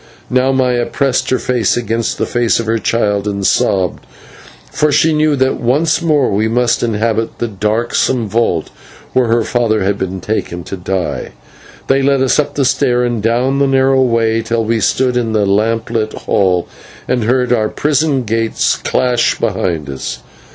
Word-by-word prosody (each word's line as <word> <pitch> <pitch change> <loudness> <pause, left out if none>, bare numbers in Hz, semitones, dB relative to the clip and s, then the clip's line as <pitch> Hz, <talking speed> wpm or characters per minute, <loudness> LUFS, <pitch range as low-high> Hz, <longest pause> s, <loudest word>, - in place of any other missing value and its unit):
Now 130 +1 +2
Maya 125 -2 +1
pressed 135 -3 0
her 130 - +2
face 120 -4 0
against 115 -1 -2
the - - -1
face 120 -1 +1
of 115 - -3
her 115 +1 0
child 105 -3 0
and 100 -1 -2
sobbed, 95 -2 +1 0.7
for 150 0 +1
she 160 +2 +3
knew 155 -1 +2
that 130 -1 0
once 145 +8 +1
more 150 -5 +2
we 105 +2 +1
must 120 +1 +1
inhabit 115 0 -1
the 120 - -2
darksome 110 +3 -1
vault 100 -7 -1 0.4
where 130 -2 +2
her 115 0 +2
father 110 -3 0
had 100 +1 -1
been 95 0 -3
taken 90 -4 -3
to - - -6
die. 90 -7 -3 0.5
They 135 0 +2
led 135 -1 +2
us 135 - +2
up 145 -1 -1
the 140 - +1
stair 125 -1 +1
and 120 -3 -1
down 125 +5 +1
the 140 - +3
narrow 135 0 +3
way, 115 -2 +1
till 115 0 -1
we 115 +1 0
stood 125 +4 +1
in 115 -2 -1
the 105 -2 +2
lamp 110 +3 0
lit 110 -2 -1
hall, 90 -3 0 0.4
and 125 -3 0
heard 125 +1 +1
our 110 -3 +1
prison 145 -2 0
gates 115 0 0
clash 125 -2 0
behind 80 -5 -2
us. 65 -3 -6
115 Hz, 175 wpm, -15 LUFS, 105-130 Hz, 0.7 s, she